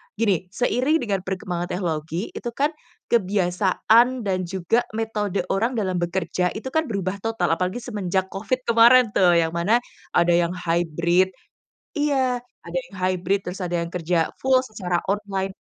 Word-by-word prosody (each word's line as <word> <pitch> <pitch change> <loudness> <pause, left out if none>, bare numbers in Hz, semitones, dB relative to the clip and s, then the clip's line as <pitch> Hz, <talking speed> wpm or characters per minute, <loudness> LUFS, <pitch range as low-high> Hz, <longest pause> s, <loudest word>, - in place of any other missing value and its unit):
gini, 195 -5 +1
seiring 250 - +1
dengan 200 -4 0
perkembangan 180 -2 -3
teknologi 170 0 -3
itu 240 - -5
kan 290 +2 +1 0.4
kebiasaan 210 +4 +3
dan 185 -3 -1
juga 190 +5 +1 0.2
metode 210 -4 -1
orang 230 +6 0
dalam 185 -5 -1
bekerja, 180 +1 -1
itu 260 +5 -5
kan 315 0 +1
berubah 200 -2 -3
total 225 -5 -1
apalagi 185 +7 -1
semenjak 190 -5 -2
covid 220 +6 -2
kemarin 235 0 +6
tuh, 175 -3 +4
yang 165 -1 +2
mana 200 +9 +1 0.3
ada 175 0 +4
yang 170 +1 +2
hybrid, 170 +1 +1 0.7
iya, 265 -4 +1 0.2
ada 170 +1 -3
yang - - -14
hybrid, 185 +1 0
terus 180 - -8
ada 175 -2 -1
yang 170 - -5
kerja 170 -1 0
full 260 -1 +3
secara 185 -7 -3
online, 200 -2 -2
190 Hz, 150 wpm, -23 LUFS, 175-225 Hz, 0.7 s, kemarin